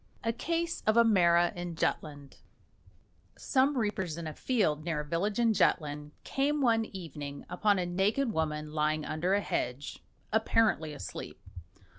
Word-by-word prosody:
A 230 +1 0
CASE 335 +5 -2
OF 215 +1 +4
A 235 - +8
MARA 175 -5 +4
IN 175 -1 -5
JUTLAND 145 -3 -3 1.0
Some 270 +1 +2
reapers 190 -7 -1
in 170 - -5
a 155 - -5
field, 170 - 0
near 160 -3 -1
a - - -8
village 180 +7 -1
in 230 -2 +3
Jutland, 150 -6 +1
came 290 +2 0
one 230 -4 +3
evening 150 -8 -7
upon 205 -2 +2
a 180 - 0
naked 205 +8 +1
woman 150 -1 -2
lying 155 0 0
under 175 +5 0
a 205 - +1
hedge, 125 -5 -3 0.3
apparently 220 -7 +2
asleep. 145 - -7
175 Hz, 150 wpm, -30 LUFS, 155-225 Hz, 1.0 s, A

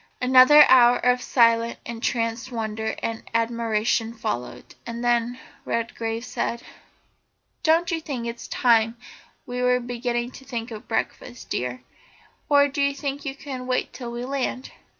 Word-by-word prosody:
Another 255 +4 +8
hour 245 -1 +6
of 250 0 +2
silent, 230 -2 +3
entranced 230 +1 -2
wonder 220 -1 -3
and 225 0 -3
admiration 230 0 0
followed, 125 - -5
and 235 +1 -5
then 240 +1 +1 0.2
Redgrave 230 0 -3
said: 235 -1 -3 1.0
"Don't 330 +2 +2
you 325 -1 -1
think 265 -6 -5
it's 235 0 -6
about - - -25
time 230 -2 +3 0.5
we 250 -2 -4
were 250 0 +3
beginning 240 0 -3
to 265 - -12
think 240 -3 -5
of 215 -1 -9
breakfast, 245 +2 -4
dear 125 0 -3 0.7
or 285 -1 +5
do 280 +1 -3
you 280 0 +1
think 280 0 -4
you 270 -1 -4
can 260 -3 -7
wait 255 0 -1
till 240 -3 -7
we 240 +1 -5
land?" 260 -1 -3
240 Hz, 150 wpm, -24 LUFS, 230-255 Hz, 1.0 s, Another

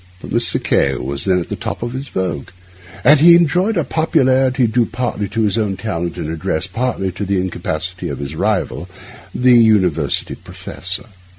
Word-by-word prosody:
But - - -10
Mr. - - +1
K— 70 -1 +2
was 70 +2 -3
then 95 -2 +3
at 85 - -6
the - - -3
top - - -5
of 120 0 -4
his 135 +2 -5
vogue; 90 -7 -3 0.7
he 170 +3 +8
enjoyed 180 +6 +2
a 170 - +2
popularity 130 -4 +2
due 115 +1 +1
partly 105 -5 -3
to 115 - -1
his 105 +1 +1
own 100 -3 -1
talent 85 -6 -4
and - - -4
address, 80 +1 -2
partly 95 -1 -2
to 95 - -6
the 100 -1 0
incapacity 90 -1 -4
of - - -4
his 70 +1 -6
rival, 85 +2 -1 0.5
the 125 0 +4
university 110 -8 +3
professor. 95 +4 -7
100 Hz, 175 wpm, -18 LUFS, 90-125 Hz, 0.7 s, he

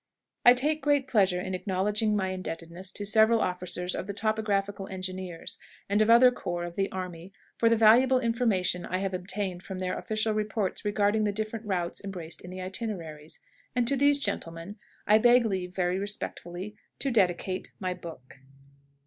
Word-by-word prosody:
I 245 +1 +8
take 300 +5 +1
great 285 -2 +2
pleasure 190 -6 +3
in 185 - -4
acknowledging 205 +3 0
my 190 -2 0
indebtedness 185 0 -5
to 205 - -5
several 220 +2 +5
officers 180 -1 -2
of - - -4
the 200 - -5
Topographical 205 -2 -1
Engineers 185 -2 -5 0.3
and 205 +2 +2
of 215 - +3
other 245 +2 +8
corps 175 -7 -4
of 175 0 -6
the 195 0 -1
army 180 -1 -6 0.3
for 230 - +4
the 230 - +4
valuable 240 +4 +6
information 220 -7 +1
I 185 - -2
have 195 0 -2
obtained 185 0 -3
from 190 0 -7
their 185 0 -2
official 215 0 -1
reports 210 -2 -2
regarding 210 +1 +1
the 205 - +1
different 215 +1 -4
routes 175 -2 -2
embraced 175 -5 -5
in 180 - -10
the 185 0 -7
itineraries, 180 -6 -5 0.4
and 245 -1 +1
to 275 - +2
these 285 +1 +4
gentlemen 165 -6 -4 0.3
I 215 +1 +6
beg 240 +1 +5
leave 185 -3 -3
very 180 0 0
respectfully 200 -1 -5 0.2
to 275 - 0
dedicate 185 -3 0
my 185 -2 -2
book. 140 -7 -11
195 Hz, 170 wpm, -28 LUFS, 180-220 Hz, 0.4 s, I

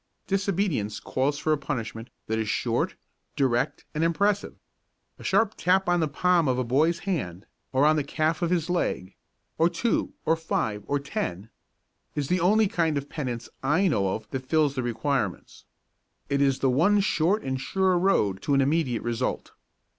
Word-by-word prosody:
Disobedience 195 - -1
calls 140 +2 -1
for 155 +1 +1
a 150 - -1
punishment 115 -5 -4 0.2
that 110 0 -1
is 110 -1 -2
short, - - 0 0.4
direct 125 -4 0
and 155 - 0
impressive. 200 +5 +1 0.6
A - - -11
sharp 220 -2 +2
tap 190 +1 +2
on 175 0 +3
the 160 - +1
palm 170 +2 +2
of 130 -1 +1
a 130 - +1
boy's 150 +8 +2
hand, 100 - -3 0.3
or 135 +2 +3
on 155 +1 +4
the 150 - +1
calf 155 +3 -1
of 170 - +1
his 170 -3 +1
leg 170 - -1 0.5
or 165 +1 +5
two 235 +5 -1
or 160 - +3
five 110 -10 -2
or 145 - +1
ten 105 -7 -4 0.6
is 145 -2 -2
the 180 - +2
only 210 +5 +4
kind 165 -5 0
of 140 0 -4
penance 125 -6 -4
I 160 +9 +2
know 100 - +1
of 110 -1 -8
that 130 -1 -5
fills 155 -3 +3
the 130 - -2
requirements. 120 -3 -2 0.6
It 140 0 +1
is 135 -1 +2
the 135 - +3
one 175 +11 +4
short 195 +1 +1
and 130 -1 -2
sure 190 +6 +1
road 110 - +2
to 140 - +1
an 135 - +4
immediate 135 -4 +1
result. 120 +1 -2
145 Hz, 175 wpm, -26 LUFS, 125-175 Hz, 0.6 s, or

